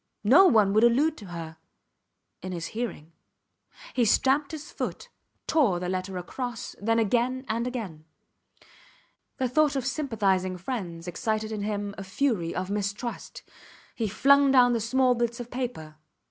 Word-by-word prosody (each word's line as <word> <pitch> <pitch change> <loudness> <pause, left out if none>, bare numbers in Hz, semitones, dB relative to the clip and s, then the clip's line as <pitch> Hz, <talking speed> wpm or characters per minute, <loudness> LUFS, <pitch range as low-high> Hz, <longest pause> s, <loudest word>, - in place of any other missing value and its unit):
No 275 - +7
one 210 - +4
would 215 +2 +4
allude 280 +7 +4
to 205 - -10
her... 165 -2 -7 0.8
in 185 0 -5
his 170 -1 -4
hearing. 220 -9 -5 0.8
He 245 - +2
stamped 270 +6 +2
his 310 -2 -8
foot, - - -5 0.4
tore 255 - +2
the 180 0 -3
letter 185 0 -3
across, 240 +6 -5
then 225 +2 +1
again 245 +4 +1
and 230 +2 -1
again. 200 -12 -6 1.3
The 260 - 0
thought 295 +3 +2
of 265 -3 -2
sympathizing 200 -10 0
friends 180 -5 -5
excited 215 +4 -2
in 215 -2 -3
him 205 -1 -3
a - - -5
fury 190 -4 -1
of 185 +1 -3
mistrust. 205 +3 -4 0.5
He 225 - -2
flung 280 +7 +4
down 250 -2 +5
the 230 - +1
small 255 +3 +3
bits 235 0 -2
of 240 0 -7
paper. 235 -12 -5
225 Hz, 150 wpm, -27 LUFS, 190-255 Hz, 1.3 s, No